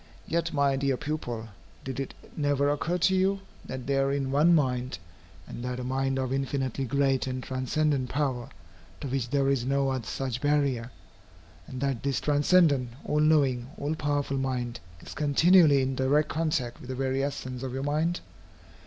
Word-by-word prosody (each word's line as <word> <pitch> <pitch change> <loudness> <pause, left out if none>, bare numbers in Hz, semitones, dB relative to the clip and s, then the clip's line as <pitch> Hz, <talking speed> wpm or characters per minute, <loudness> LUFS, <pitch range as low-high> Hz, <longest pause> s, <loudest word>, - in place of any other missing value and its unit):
Yet, 170 0 0
my 140 -2 +2
dear 135 -1 +1
pupil, 120 -7 -4 0.3
did 130 -1 -5
it 135 - -4 0.2
never 145 -1 +1
occur 165 +4 -1
to 180 +2 +3
you, 195 +1 +2 0.2
that 130 -1 -6
there 135 0 +1
is 140 0 0
One 150 +6 +4
Mind, 125 - 0 0.5
and 120 - -8
that 125 0 -3
a - - -4
mind 135 +1 0
of 130 -1 -1
infinitely 135 -1 -1
great 135 0 +1
and 130 0 -3
transcendent 130 +1 0
power, 130 -4 -1 0.5
to - - -5
which 130 -2 -2
there 140 0 +2
is 135 -3 +2
no 135 +1 +1
such 125 +2 -4
barrier, 140 -5 +1 0.8
and 130 0 -7
that 135 -4 -1
this 140 -2 0
transcendent, 145 -3 +3 0.2
all 150 - +1
knowing, 140 -6 +3
all 145 +2 -2
powerful 145 -3 -1
mind, 125 -2 -2 0.2
is - - -9
continually 150 0 +5
in 130 +1 -1
direct 140 +4 +2
contact 150 -7 -1
with 125 - -11
the 130 - -3
very 135 +1 0
essence 130 -3 -4
of 130 -1 -4
your 135 +1 -3
mind? 155 +4 0
135 Hz, 170 wpm, -28 LUFS, 130-145 Hz, 0.8 s, continually